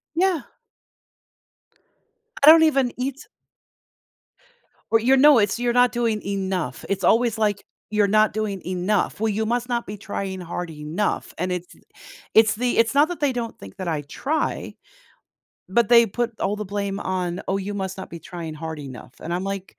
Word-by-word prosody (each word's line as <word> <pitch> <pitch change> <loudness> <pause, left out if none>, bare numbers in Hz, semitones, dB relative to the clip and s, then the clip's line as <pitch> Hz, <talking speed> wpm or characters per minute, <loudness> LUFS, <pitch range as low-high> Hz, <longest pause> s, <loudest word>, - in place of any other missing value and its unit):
Yeah. 360 -2 +2 2.0
I 300 - +10
don't 320 0 +7
even 270 -5 +2
eat 270 +3 -4 1.6
Or, 225 - +5
your 260 +4 +4
know 290 -1 +7
it's 205 +2 +1
"You're 240 -1 +1
not 245 0 +4
doing 230 -3 0
enough." 190 -8 -3
It's 195 -2 -1
always 230 +3 +3
like, 210 -2 0 0.3
"You're 210 -1 +3
not 215 +1 +3
doing 210 -3 -3
enough. 185 +4 -1
Well, 220 +1 +1
you 220 +1 -1
must 240 +2 -1
not 240 -1 -1
be 205 - -7
trying 195 -1 -5
hard 175 0 -5
enough", 155 +6 -3
and 180 +2 -2
it's 180 -1 -5 0.6
it's 220 -1 +5
the 245 +2 -1
it's 230 +4 +3
not 290 +2 +5
that 355 - -5
they 290 -3 +2
don't 235 -2 -4
think 95 -1 -12
that 185 - -5
I 155 -3 -1
try, 280 - -3 0.9
but 230 +2 +3
they 235 -1 +7
put 235 +2 -3
all 200 - 0
the 210 - -4
blame 200 0 -3
on, 180 -1 -2
"Oh, 195 - 0
you 200 +1 -4
must 190 -1 -4
not 190 - -7
be 170 - -8
trying 165 -2 -7
hard 160 0 -6
enough," 130 -3 -10
and 170 - -4
I'm 180 +2 -2
like, 195 -1 -5
205 Hz, 180 wpm, -23 LUFS, 185-240 Hz, 2.0 s, I